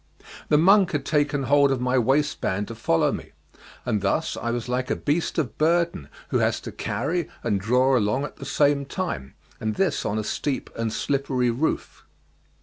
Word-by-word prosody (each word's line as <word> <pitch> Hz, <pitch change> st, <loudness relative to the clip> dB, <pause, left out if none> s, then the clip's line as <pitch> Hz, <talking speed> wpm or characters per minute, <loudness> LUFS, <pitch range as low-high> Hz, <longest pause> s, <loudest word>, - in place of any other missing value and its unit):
The 150 Hz, -, +5 dB
monk 190 Hz, +3 st, +5 dB
had 145 Hz, -2 st, -1 dB
taken 145 Hz, -2 st, +1 dB
hold 140 Hz, +1 st, +4 dB
of 135 Hz, -, 0 dB
my 125 Hz, +1 st, +2 dB
waistband 130 Hz, -6 st, 0 dB
to -, -, -5 dB
follow 110 Hz, -7 st, +1 dB
me, -, -, -7 dB, 0.5 s
and 105 Hz, -, 0 dB
thus 100 Hz, +11 st, 0 dB
I 120 Hz, -, -3 dB
was 120 Hz, 0 st, -2 dB
like 125 Hz, +1 st, -1 dB
a -, -, +1 dB
beast 155 Hz, +3 st, -1 dB
of 135 Hz, -9 st, -2 dB
burden 165 Hz, -, +1 dB, 0.2 s
who -, -, +1 dB
has -, -, +1 dB
to -, -, -7 dB
carry 175 Hz, -2 st, -2 dB
and 100 Hz, -, +1 dB
draw 125 Hz, +5 st, +3 dB
along 110 Hz, +3 st, +1 dB
at 145 Hz, -, -7 dB
the -, -, -8 dB
same 145 Hz, -1 st, +2 dB
time; 135 Hz, -, -4 dB, 0.2 s
and 110 Hz, -1 st, -2 dB
this 195 Hz, -, +1 dB
on 105 Hz, -, -1 dB
a 110 Hz, -, -1 dB
steep 135 Hz, +5 st, -3 dB
and 115 Hz, -1 st, -2 dB
slippery 130 Hz, -1 st, 0 dB
roof. 135 Hz, +7 st, -2 dB
135 Hz, 185 wpm, -24 LUFS, 115-150 Hz, 0.5 s, The